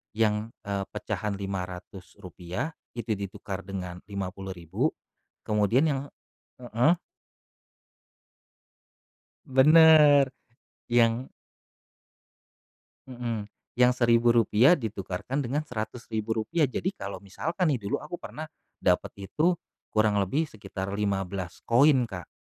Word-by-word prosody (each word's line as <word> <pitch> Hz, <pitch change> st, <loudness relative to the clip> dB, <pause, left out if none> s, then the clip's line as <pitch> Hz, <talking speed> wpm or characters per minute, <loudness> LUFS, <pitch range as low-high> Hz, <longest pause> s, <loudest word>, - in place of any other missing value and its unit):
yang, 110 Hz, 0 st, +1 dB
eee, 100 Hz, -1 st, -2 dB
pecahan 105 Hz, 0 st, -3 dB
Rp500 95 Hz, -, -6 dB, 0.2 s
itu 120 Hz, -1 st, -4 dB
ditukar 100 Hz, 0 st, -6 dB
dengan 90 Hz, -2 st, -5 dB
Rp50.000 95 Hz, -, -3 dB, 0.6 s
kemudian 105 Hz, +5 st, +2 dB
yang 135 Hz, -3 st, 0 dB, 0.6 s
heeh. 125 Hz, +7 st, +2 dB, 2.5 s
Bener, 150 Hz, +1 st, +7 dB, 0.7 s
yang 120 Hz, +1 st, +3 dB, 1.8 s
Mhm, 120 Hz, -4 st, -4 dB, 0.3 s
yang 125 Hz, 0 st, +6 dB
Rp1.000 120 Hz, +3 st, +5 dB
ditukarkan 110 Hz, -, -4 dB
dengan 140 Hz, +4 st, -1 dB
Rp100.000, 115 Hz, +4 st, -2 dB
jadi 185 Hz, +8 st, -2 dB
kalau 100 Hz, -, -6 dB
misalkan 165 Hz, -, -1 dB
nih, 125 Hz, -, -1 dB
dulu 100 Hz, -, -1 dB
aku 175 Hz, -, -7 dB
pernah 155 Hz, -, -7 dB, 0.3 s
dapet 100 Hz, -, 0 dB
itu 170 Hz, +3 st, +2 dB, 0.3 s
kurang 110 Hz, -2 st, +2 dB
lebih 135 Hz, -, +1 dB
sekitar 100 Hz, -3 st, -6 dB
15 95 Hz, -3 st, -3 dB
koin 130 Hz, +2 st, +5 dB
Kak, 90 Hz, -7 st, -8 dB
110 Hz, 90 wpm, -27 LUFS, 100-130 Hz, 2.5 s, Bener